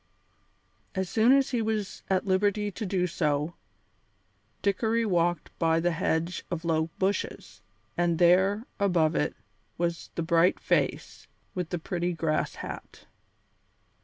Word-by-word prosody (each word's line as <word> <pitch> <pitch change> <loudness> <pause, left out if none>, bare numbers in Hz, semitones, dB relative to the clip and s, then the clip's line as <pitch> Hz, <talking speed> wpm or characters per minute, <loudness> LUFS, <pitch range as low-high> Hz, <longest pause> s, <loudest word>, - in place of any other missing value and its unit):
As 190 -1 -1
soon 225 +2 +4
as 275 -1 +4
he 240 -3 +1
was 215 -3 -2
at 190 0 +1
liberty 205 +2 +1
to 215 +1 -5
do 180 -1 +1
so, 155 -2 0 1.1
Dickory 220 +3 +1
walked 175 -4 +1
by 165 0 +3
the 175 +1 +1
hedge 165 +1 -1
of 175 -1 -4
low 160 -1 +1
bushes, 195 +2 -2 0.3
and 175 -1 +1
there, 190 +5 +4
above 175 -6 +3
it, 150 - 0 0.4
was 170 -1 -2
the 170 - -1
bright 170 +2 +3
face, - - -1 0.3
with 180 -3 -3
the 175 - -2
pretty 175 +1 -2
grass 160 -2 -1
hat. - - -8
180 Hz, 135 wpm, -28 LUFS, 165-200 Hz, 1.1 s, soon